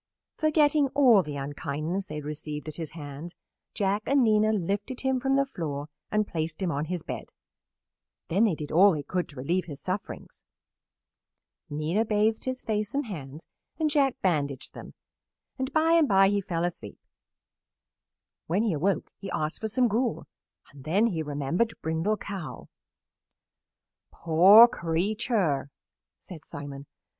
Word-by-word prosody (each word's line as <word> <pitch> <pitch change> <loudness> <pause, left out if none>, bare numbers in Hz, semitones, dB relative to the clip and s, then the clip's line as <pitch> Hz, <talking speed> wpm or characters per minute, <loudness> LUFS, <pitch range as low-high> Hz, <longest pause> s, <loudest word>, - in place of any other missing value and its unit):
Forgetting 300 -2 +3
all 250 -8 +6
the 150 -4 -6
unkindness 145 +6 -3
they 150 - -7
had 150 - -5
received 150 0 -6
at 155 - -6
his 165 -2 -6
hands, 150 +2 -8 0.4
Jack 200 +1 0
and 275 -1 +4
Nina 215 -1 +3
lifted 205 +5 -2
him 265 -1 +1
from 270 +1 +1
the 275 0 +3
floor 150 - -5 0.2
and 215 0 +1
placed 160 -1 -3
him 185 -3 -1
on 145 +1 -2
his 175 0 -4
bed. - - -7 1.0
Then 195 +7 +2
they 195 -7 +1
did 150 -1 -7
all 190 +4 +6
they 150 -2 -3
could 180 +4 -2
to 145 - -13
relieve 170 +8 -1
his 145 -5 -8
sufferings. 190 +2 -6 1.3
Nina 155 +8 0
bathed 215 0 +1
his 255 -1 -4
face 215 +1 -2
and 285 0 0
hands 155 - -8 0.3
and 310 -2 0
Jack 275 -3 +2
bandaged 145 -7 -1
them, - - -11 0.6
and 260 +1 -2
by 320 +1 +3
and 330 -3 +5
by 195 -2 +5
he 205 0 +1
fell 170 -3 -2
asleep. 170 - -5 1.5
When 190 +7 +1
he 215 -6 +1
awoke 185 +6 -1
he 195 - -7
asked 155 -2 -3
for 220 - -1
some 245 +3 +2
gruel, 230 +2 -1 0.5
and 140 -2 -14
then 190 - +2
he 180 -9 -1
remembered 150 +9 -1
Brindle 160 +7 0
Cow. 195 -6 -7 1.4
"Poor 190 +8 +7
creature!" 175 - -1 0.5
said 165 -5 -11
Simon. 145 -2 -8
185 Hz, 150 wpm, -27 LUFS, 155-220 Hz, 1.5 s, Poor